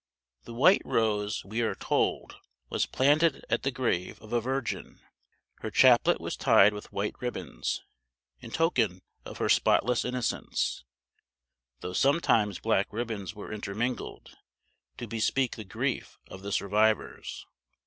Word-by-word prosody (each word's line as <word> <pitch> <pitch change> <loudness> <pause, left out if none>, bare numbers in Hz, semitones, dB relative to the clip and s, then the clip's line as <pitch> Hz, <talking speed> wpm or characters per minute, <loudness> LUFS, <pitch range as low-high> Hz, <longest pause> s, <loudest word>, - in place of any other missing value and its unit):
The 115 - -9
white 180 +11 +5
rose, 105 -2 0
we 110 +4 -2
are 115 - 0
told, - - -1 0.3
was - - 0
planted 145 +3 +2
at 120 - +2
the 135 - 0
grave 120 -9 -2
of 110 +1 -11
a 120 - +2
virgin; 130 +1 -3 0.6
her - - -4
chaplet - - +5
was - - -4
tied 105 +2 +5
with 105 - -9
white 100 +1 -2
ribbons, 125 -2 -4 0.6
in 120 - -10
token 115 - +1 0.2
of - - -8
her - - 0
spotless 125 -1 +3
innocence, 125 - -2 1.0
though 90 - -5
sometimes 115 - +2
black 110 -3 +1
ribbons 110 -2 -4
were 105 +1 -7
intermingled, 110 +4 -4 0.6
to 120 - -5
bespeak 115 +3 0
the 110 - -7
grief 95 - -3
of 95 - -10
the 100 +1 -6
survivors. 105 +3 0
115 Hz, 135 wpm, -28 LUFS, 105-125 Hz, 1.0 s, white